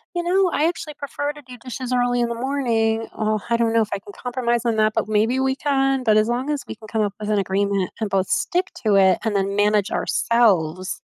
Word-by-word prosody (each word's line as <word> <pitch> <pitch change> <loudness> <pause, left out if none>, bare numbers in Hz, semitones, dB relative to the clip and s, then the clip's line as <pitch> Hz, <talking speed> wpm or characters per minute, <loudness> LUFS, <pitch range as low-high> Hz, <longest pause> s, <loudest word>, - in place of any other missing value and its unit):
you 345 - -1
know, 370 +1 +2
I 310 +3 +2
actually 330 -3 -4
prefer 285 +1 -4
to 295 - -13
do 250 -1 -11
dishes 255 +1 -6
early 245 0 +1
in 235 - 0
the 235 - -3
morning." 230 -4 0
"Oh, 215 -1 0
I 235 - +2
don't 230 -1 +1
know 230 - +4
if 215 - -1
I 200 - -2
can 205 - -13
compromise 240 -2 -1
on 225 -2 +1
that, 215 0 +3
but - - -1
maybe 220 +5 +2
we 265 0 +1
can," 270 -2 +1
but 215 -2 +3
as 215 +1 +3
long 255 +4 -1
as 290 -4 -2
we - - -6
can 220 0 -14
come 220 0 -1
up 205 -1 -1
with 210 0 -4
an 210 -1 +2
agreement 195 0 0
and 215 -2 -2
both 190 -1 0
stick 365 +2 0 0.2
to 205 -2 +4
it 190 -2 +5
and 215 -2 0
then 200 0 0
manage 205 -1 +2
ourselves 185 -7 +1
230 Hz, 250 wpm, -22 LUFS, 210-265 Hz, 0.2 s, it